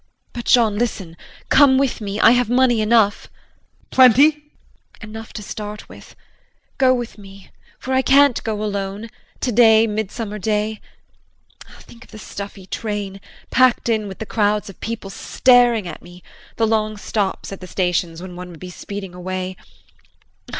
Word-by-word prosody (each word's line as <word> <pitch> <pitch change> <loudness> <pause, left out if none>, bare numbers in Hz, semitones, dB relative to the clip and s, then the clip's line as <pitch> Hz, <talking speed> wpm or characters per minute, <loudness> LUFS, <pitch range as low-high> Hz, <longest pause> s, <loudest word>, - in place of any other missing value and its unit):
But, 240 -1 -6
Jean, 220 -4 +3
listen 195 -8 -3 0.3
come 275 -2 +6
with 270 -4 0
me, 205 0 -4
I - - +7
have 245 -1 +2
money 245 -2 +3
enough. 215 -1 +2
JEAN. - - -36
Plenty? 260 +4 +6
JULIE. 300 -1 -24 0.6
Enough 220 +1 -9
to 210 - -7
start 210 +1 -7
with. - - -14 0.6
Go 260 -1 +5
with 240 -4 -3
me 195 -1 -14 0.3
for 260 - -4
I 260 - +3
can't 275 -1 +4
go 215 -1 -3
alone 200 +1 -4 0.3
today, 225 -2 +5
midsummer 210 0 -4
day. 210 +1 -2 1.0
Think 235 +1 -16
of - - -26
the - - -11
stuffy 200 -2 -8
train, 200 -1 -5 0.3
packed 255 -2 +3
in 215 -2 0
with 190 - -8
the 220 - -6
crowds 210 -1 0
of - - -22
people 225 -4 -6
staring 240 -2 +3
at 165 - -8
one; 175 +1 -14 0.3
the 225 - +1
long 215 -1 0
stops 200 -2 -3
at 195 - -7
the 185 - -8
stations 180 -2 -2
when 185 -1 -9
one 180 0 -8
would 165 -3 -12
be 180 0 -9
speeding 195 0 -8
away. 185 +1 -5
215 Hz, 160 wpm, -20 LUFS, 195-235 Hz, 1.0 s, I